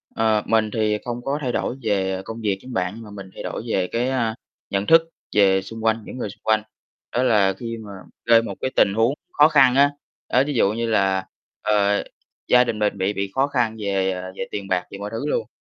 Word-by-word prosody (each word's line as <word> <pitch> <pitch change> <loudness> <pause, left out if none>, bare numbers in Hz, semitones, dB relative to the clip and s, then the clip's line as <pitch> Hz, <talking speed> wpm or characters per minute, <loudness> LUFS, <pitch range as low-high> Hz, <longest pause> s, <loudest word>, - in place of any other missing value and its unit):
Ờ, 110 -1 +2
mình 110 -1 +2
thì 105 -2 +1
không 120 0 -4
có 140 +2 -1
thay 125 -3 -1
đổi 125 - -2
về 95 -3 0
công 115 0 -7
việc 100 -3 0
giống 130 -1 -9
bạn 95 +4 -2
mà 105 - -11
mình 100 -2 -9
thay - - -8
đổi - - -4
về, 95 -4 0
cái, 120 +3 0
ơ, 115 -4 0 0.4
nhận 100 +1 -1
thức 165 0 +7 0.3
về 95 -2 +5
xung 115 +3 -9
quanh, 110 -1 +1
những - - -8
người 110 - -3
xung - - -14
quanh. 110 -1 +2 0.5
Đó 125 - +1
là 100 -5 +3
khi 115 -1 -5
mà 105 -2 -9 0.3
rơi 115 -1 +6
một 115 - -6
cái 130 - -1
tình 100 - +4
huống 115 +5 +2 0.2
khó 150 +1 +6
khăn 135 -5 +5
á, 140 +1 +5 0.4
đó, 130 +2 +4
ví 145 - -1
dụ 105 -4 +3
như 115 +1 -2
là, 95 -3 +1 0.4
ờ, 105 -1 +2 0.4
gia 125 0 +6
đình 115 -3 -3
mình 105 -1 0
bị 95 +2 0
bị 100 -1 -3
khó 135 +1 +3
khăn 120 -5 0
về, 95 -2 0
ờ, 95 0 -5
về 95 - -4
tiền 100 -1 -5
bạc, 90 -2 0
về 100 - -7
mọi 100 +1 -5
thứ 115 +6 -4
luôn. 110 -5 -1
110 Hz, 240 wpm, -22 LUFS, 100-120 Hz, 0.5 s, thức